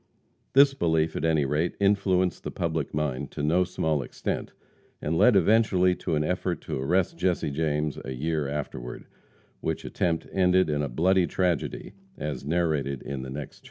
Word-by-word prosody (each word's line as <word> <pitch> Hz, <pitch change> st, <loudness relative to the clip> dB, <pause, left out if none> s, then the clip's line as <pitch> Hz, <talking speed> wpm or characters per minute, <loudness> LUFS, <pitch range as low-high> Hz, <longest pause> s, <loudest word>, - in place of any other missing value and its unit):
This 140 Hz, +1 st, +7 dB
belief, 80 Hz, -8 st, +1 dB
at -, -, -3 dB
any 80 Hz, -3 st, +2 dB
rate, 75 Hz, +5 st, 0 dB
influenced 100 Hz, -2 st, +2 dB
the -, -, -3 dB
public 80 Hz, -4 st, -2 dB
mind 70 Hz, -2 st, -2 dB
to -, -, -4 dB
no 85 Hz, +5 st, +3 dB
small 80 Hz, -4 st, -1 dB
extent, -, -, -4 dB, 0.5 s
and 80 Hz, +3 st, -2 dB
led 120 Hz, +7 st, +5 dB
eventually 95 Hz, -2 st, +4 dB
to 80 Hz, -, -2 dB
an 75 Hz, -, +1 dB
effort 90 Hz, 0 st, -1 dB
to -, -, -4 dB
arrest 85 Hz, +3 st, +1 dB
Jesse 90 Hz, -4 st, 0 dB
James 75 Hz, 0 st, -1 dB
a 65 Hz, -, -5 dB
year 75 Hz, +2 st, -1 dB
afterward, 65 Hz, -4 st, -5 dB, 0.5 s
which -, -, -3 dB
attempt 85 Hz, -2 st, -1 dB
ended 90 Hz, -3 st, +3 dB
in 75 Hz, 0 st, 0 dB
a 70 Hz, -, -2 dB
bloody 90 Hz, +7 st, +2 dB
tragedy, 90 Hz, +1 st, -1 dB, 0.2 s
as 75 Hz, -2 st, -4 dB
narrated 75 Hz, -4 st, 0 dB
in 70 Hz, -1 st, -5 dB
the 65 Hz, -, -7 dB
next 70 Hz, +1 st, -7 dB
chapter. -, -, -21 dB
80 Hz, 170 wpm, -27 LUFS, 75-90 Hz, 0.5 s, This